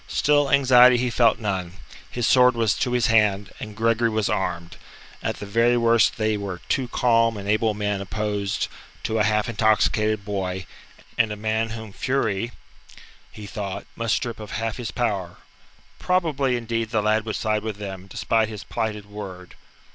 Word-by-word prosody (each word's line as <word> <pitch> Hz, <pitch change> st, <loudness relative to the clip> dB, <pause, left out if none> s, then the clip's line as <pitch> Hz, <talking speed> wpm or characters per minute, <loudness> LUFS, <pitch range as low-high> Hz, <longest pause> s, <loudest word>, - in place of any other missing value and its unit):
Still, 145 Hz, -1 st, +2 dB
anxiety 125 Hz, -2 st, +6 dB
he 125 Hz, 0 st, 0 dB
felt 115 Hz, -2 st, +3 dB
none; 95 Hz, -5 st, -3 dB, 0.4 s
his 120 Hz, -1 st, -2 dB
sword 125 Hz, 0 st, +5 dB
was 115 Hz, -3 st, +2 dB
to 125 Hz, -1 st, -1 dB
his 125 Hz, -1 st, +2 dB
hand, 105 Hz, -3 st, +2 dB
and 105 Hz, -1 st, -8 dB
Gregory 115 Hz, +1 st, +2 dB
was 110 Hz, -2 st, 0 dB
armed; 85 Hz, -2 st, -3 dB, 0.4 s
at -, -, -2 dB
the -, -, -7 dB
very 115 Hz, +4 st, +2 dB
worst 115 Hz, -1 st, +3 dB
they 110 Hz, -1 st, 0 dB
were 100 Hz, -3 st, -5 dB
two 130 Hz, -2 st, 0 dB
calm 115 Hz, -2 st, +2 dB
and 100 Hz, 0 st, -7 dB
able 110 Hz, +1 st, +1 dB
men 105 Hz, -1 st, -2 dB
opposed 100 Hz, 0 st, -2 dB, 0.4 s
to 110 Hz, 0 st, -1 dB
a -, -, +4 dB
half 105 Hz, 0 st, +1 dB
intoxicated 110 Hz, -1 st, +1 dB
boy, 95 Hz, -2 st, -3 dB, 0.5 s
and 110 Hz, -2 st, +3 dB
a -, -, -3 dB
man 110 Hz, +1 st, -1 dB
whom 110 Hz, -2 st, -8 dB
fury, 115 Hz, -4 st, -1 dB, 0.8 s
he 105 Hz, -, -10 dB
thought, 100 Hz, -1 st, -5 dB
must 115 Hz, -1 st, 0 dB
strip 120 Hz, -4 st, -4 dB
of 105 Hz, -1 st, -8 dB
half 115 Hz, +1 st, -3 dB
his 120 Hz, -3 st, -4 dB
power. 100 Hz, -8 st, -2 dB, 0.6 s
Probably, 150 Hz, -8 st, +1 dB
indeed, 115 Hz, -1 st, -2 dB
the 110 Hz, -2 st, 0 dB
lad 110 Hz, +1 st, +2 dB
would 110 Hz, -, -2 dB
side 110 Hz, -1 st, 0 dB
with 110 Hz, -1 st, -4 dB
them, 95 Hz, -2 st, -7 dB
despite 110 Hz, +2 st, 0 dB
his 105 Hz, -2 st, -7 dB
plighted 110 Hz, -3 st, -3 dB
word. 95 Hz, -3 st, -9 dB
110 Hz, 170 wpm, -23 LUFS, 105-115 Hz, 0.8 s, anxiety